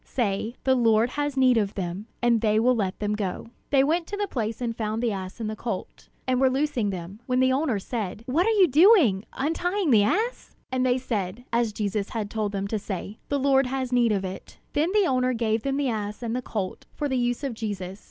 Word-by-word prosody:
say, 220 -1 -2
'The 260 - +4
Lord 230 -1 +3
has 290 -1 -2
need 255 -2 +5
of 205 -2 0
them,' 190 +2 -4 0.2
and 235 -2 +3
they 215 -1 +3
will 250 +3 +4
let 200 -6 -1
them 210 0 -1
go." 205 0 -3 0.2
They 275 -2 +4
went 325 +4 +1
to 410 - -4
the 410 0 -1
place 225 - -3
and 235 -2 -2
found 220 +1 -2
the 235 - +2
ass 190 +1 -6
and 225 - -3
the 215 - -3
colt, 220 -3 -6 0.2
and 255 0 +2
were 265 - +5
loosing 265 -5 0
them, 185 +2 -6
when 255 -1 +1
the 260 0 +4
owner 265 -5 +1
said: 210 0 -4
"What 320 - +1
are - - +4
you 410 -5 +5
doing, 300 - +5
untying 350 +4 0
the 220 -3 +6
ass?" 435 - -1 0.2
And 255 0 +1
they 255 0 +3
said, 225 -3 -3
as 235 -1 +2
Jesus 205 -1 -2
had 215 -3 -4
told 215 -2 -1
them 200 -1 -2
to 220 - -1
say: 200 +1 -6
"The 285 - +1
Lord 270 -1 +3
has 260 -1 -2
need 240 -2 +4
of 195 -2 0
it." 185 0 -8 0.2
Then 315 +5 +1
the 415 -1 +3
owner 255 -3 +1
gave 225 -2 0
them 275 +2 -1
the 280 -2 +1
ass 210 0 -4
and 230 0 -2
the 255 - -1
colt 205 -6 -4
for 295 - -1
the 265 - -1
use 245 +2 0
of 270 -3 -2
Jesus. 200 -4 -5
235 Hz, 235 wpm, -26 LUFS, 210-265 Hz, 0.2 s, the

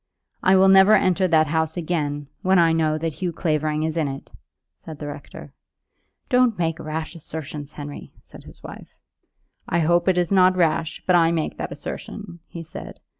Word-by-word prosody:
"I 190 - +4
will 190 0 +5
never 195 +2 +7
enter 185 -1 +2
that 160 -2 +4
house 160 +2 -1
again, 150 -4 -2 0.2
when 190 -1 +3
I 165 -1 +4
know 155 -1 +1
that 160 0 -3
Hugh 180 +3 -3
Clavering 155 -2 -1
is 160 0 -2
in 155 -3 +1
it," 135 0 -7 0.4
said 160 -2 -11
the 150 - -7
rector. 145 -1 -9 0.7
"Don't 250 -4 +3
make 165 -2 -1
rash 155 +1 -5
assertions, 150 -2 -7
Henry," 145 -1 -8
said - - -13
his - - -15
wife. - - -10 0.8
"I 170 - +1
hope 170 +3 +2
it 185 -1 +3
is 175 0 +1
not 185 -1 +4
rash, 165 -2 0
but 180 - +3
I 165 -1 +4
make 160 -2 -2
that - - -4
assertion," 190 -5 -8
he 170 - -8
said. - - -10
165 Hz, 180 wpm, -23 LUFS, 155-180 Hz, 0.8 s, never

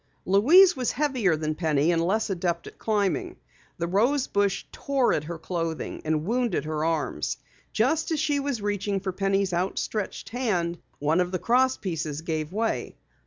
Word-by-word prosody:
Louise 315 - +6
was 255 -2 -1
heavier 255 - +1
than 155 0 -2
Penny 155 -1 +1
and 165 -1 +1
less 210 +4 0
adept 170 -2 -1
at - - -12
climbing. 220 - 0 0.4
The 170 - -1
rose 235 +10 +2
bush 200 -1 0
tore 275 -3 +1
at 150 - -1
her 170 +1 -5
clothing 165 -1 -4
and 155 0 0
wounded 235 -5 0
her 155 0 -2
arms. 165 -1 -1 0.3
Just 320 0 +1
as 320 -2 0
she 295 -1 +1
was 275 -6 -2
reaching 205 -1 -1
for 190 0 -3
Penny's 195 0 0
outstretched 190 +3 -2
hand 185 -9 -1 0.2
one 155 +4 +1
of 180 0 -1
the 185 - 0
cross 255 +6 +2
pieces 160 -5 -3
gave 155 -1 -3
way. 220 +3 -2
195 Hz, 165 wpm, -26 LUFS, 165-245 Hz, 0.4 s, Louise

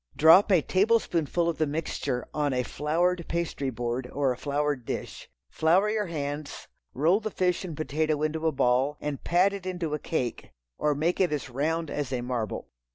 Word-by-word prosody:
Drop 165 +7 +7
a 175 -6 +5
tablespoonful 180 -5 +1
of 170 - -2
the 155 - +2
mixture 145 -4 -3
on 145 -2 0
a 125 0 +1
floured 170 +6 0
pastry 170 -5 -2
board, 120 +1 -3
or 140 -2 +1
a - - -2
floured 145 -1 -1
dish. - - -6 0.2
Flour 185 +7 +3
your 215 -2 -1
hands, 145 -2 -5 0.3
roll 165 +9 +3
the 220 -1 -3
fish 180 -3 0
and 165 -5 -6
potato 155 0 0
into 160 +1 0
a - - +3
ball, 135 +2 +1
and 145 -2 -4
pat 185 +3 +3
it 195 -2 -6
into 175 -4 -3
a 150 - -1
cake, 130 -7 -3 0.3
or 150 -1 +2
make 165 +5 0
it 180 - +3
as 140 -3 -3
round 160 +5 -1
as 145 -3 -3
a 125 -2 -1
marble. 120 -4 -3
155 Hz, 185 wpm, -27 LUFS, 140-175 Hz, 0.3 s, Drop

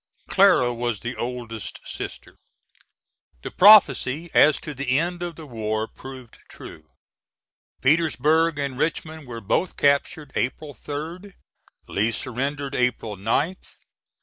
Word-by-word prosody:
[Clara 185 -11 +4
was 120 -3 -3
the 120 +1 -5
oldest 120 -3 -5
sister. - - -8 1.0
The - - -6
prophecy 170 - +5
as 150 0 +5
to 150 - -6
the 130 -1 0
end 175 +2 -1
of 175 -2 -4
the 160 - -10
war 110 -3 -3
proved 130 -2 -12
true. 80 -1 -12 0.9
Petersburg 160 +2 +2
and 140 -2 -3
Richmond 155 -1 -3
were 115 -2 -7
both 170 - -1
captured 140 0 +1
April 145 +4 -3
3d. 165 - -7 0.5
Lee 110 +4 0
surrendered 135 +5 -3
April 125 -4 -1
9th. 130 - -2
140 Hz, 120 wpm, -23 LUFS, 120-160 Hz, 1.0 s, prophecy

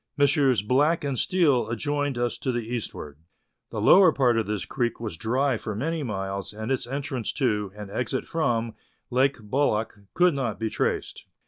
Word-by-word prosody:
Messrs. 140 -5 +3
Black 145 +9 +2
and 140 -2 -1
Steele 140 -6 +2
adjoined 145 +3 -1
us 120 0 -1
to 130 - -1
the 120 -2 -2
eastward. 105 -11 -5 0.5
The - - -4
lower 185 -3 +7
part 125 -5 +2
of 115 -2 0
this 105 -3 -2
creek 120 -3 -2
was 110 -7 -5
dry 125 - 0
for 110 -1 -5
many 160 +8 -2
miles, 100 -5 -4
and 110 +4 -4
its 130 -2 -1
entrance 135 -2 -3
to, 105 -8 0
and 105 -1 -8
exit 125 +4 -2
from, 115 -8 0 0.4
Lake 135 +2 +2
Bolac 115 0 0 0.2
could 180 -1 +4
not 125 -7 -2
be 110 -1 -2
traced. - - -2
125 Hz, 175 wpm, -26 LUFS, 110-140 Hz, 0.5 s, lower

